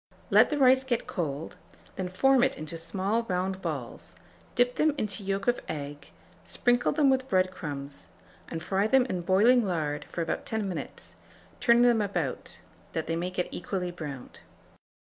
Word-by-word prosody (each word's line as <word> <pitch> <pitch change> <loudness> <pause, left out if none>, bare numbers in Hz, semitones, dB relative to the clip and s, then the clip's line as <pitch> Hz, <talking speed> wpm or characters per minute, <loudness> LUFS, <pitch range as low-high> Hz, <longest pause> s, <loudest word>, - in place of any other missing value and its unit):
Let - - +6
the 300 - -1
rice 260 -1 +5
get 245 -3 -1
cold; 155 -1 -4 0.4
then 185 -1 -3
form 260 +7 +4
it 270 0 +1
into 155 +1 -6
small 190 +7 -1
round 190 -2 -2
balls, 145 -9 -6 0.4
dip 245 0 +3
them 305 -1 +3
into 210 -3 -3
yolk 195 0 -2
of 245 - +3
egg, 145 -1 -6 0.3
sprinkle 245 0 +1
them 285 -4 +4
with 260 0 0
bread 185 -1 +2
crumbs, 145 -5 -7 0.4
and 165 -1 -5
fry 195 +3 +1
them 260 +2 +4
in 180 - -2
boiling 215 +8 +4
lard 155 -6 -2
for 170 - -3
about 165 - -3
10 220 -2 -1
minutes, 180 -4 -6 0.4
turning 235 -1 +5
them 240 -2 +4
about, 175 -9 -3 0.3
that 160 - -2
they 165 - -1
may 175 +2 -2
get 180 -1 -2
equally 180 -1 -3
browned. 145 -7 -8
190 Hz, 165 wpm, -28 LUFS, 165-240 Hz, 0.4 s, Let